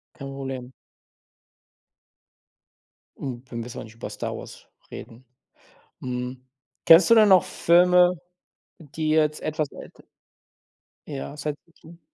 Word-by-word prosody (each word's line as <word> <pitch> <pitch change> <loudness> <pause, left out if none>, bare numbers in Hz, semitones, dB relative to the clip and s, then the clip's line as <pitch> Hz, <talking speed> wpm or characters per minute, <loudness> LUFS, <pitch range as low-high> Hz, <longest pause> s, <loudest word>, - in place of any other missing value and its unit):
Kein 140 -4 -8
Problem. 135 -2 -6 2.5
Hm, 125 -3 -6
wir 120 - -7
müssen 115 +1 -6
auch - - -7
nicht 110 0 -14
über 115 - -7
Star - - -5
Wars - - -12 0.2
reden. 120 +3 -11 0.8
Hm, 125 0 -5 0.4
kennst 165 +6 +8
du 230 - +7
denn 215 -2 +6
noch 185 -3 +6
Filme, 180 +1 +4 0.6
die 155 0 -4
jetzt 155 -1 +2
etwas 155 -1 -2
älter - - -13 1.0
Ja, 140 -1 -6
Science-Fiction. 160 +3 -9
150 Hz, 115 wpm, -24 LUFS, 130-170 Hz, 2.5 s, kennst